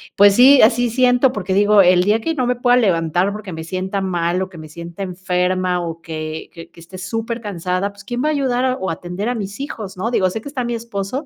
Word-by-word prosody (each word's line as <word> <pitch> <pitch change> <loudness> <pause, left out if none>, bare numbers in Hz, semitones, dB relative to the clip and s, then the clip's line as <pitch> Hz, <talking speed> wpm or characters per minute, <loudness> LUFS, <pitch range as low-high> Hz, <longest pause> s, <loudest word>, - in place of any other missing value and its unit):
Pues 200 0 +6
sí, 265 +3 +7
así 240 +2 +4
siento, 250 +1 +3
porque 190 -3 -2
digo, 205 0 +5
el 180 0 +5
día 210 +3 +2
que 325 +6 -2
no 255 - 0
me 250 0 +1
pueda 245 0 +3
levantar 180 -3 +1
porque 210 -2 -7
me 160 -1 -6
sienta 185 +3 -3
mal 175 -2 -1
o - - -5
que 170 -4 -12
me 155 - -10
sienta 170 +3 -9
enferma 180 0 -1
o 165 -1 -6
que 155 -1 -6
que 165 -1 -11
que - - -18
esté 180 +3 -11
supercansada, 200 -3 -3
pues, 205 - -15
quién 245 +2 -3
va 305 - +2
a - - +2
ayudar 255 -2 0
o 190 - -3
atender 180 +5 -5
a 245 - -1
mis 200 +1 -6
hijos, 215 -9 -6
¿no? 225 +6 -2
Digo, 185 -5 +2
sé 220 - -4
que 225 - -11
está 260 -3 -3
mi 240 0 -2
esposo, 230 +4 -4
200 Hz, 240 wpm, -19 LUFS, 180-240 Hz, -, sí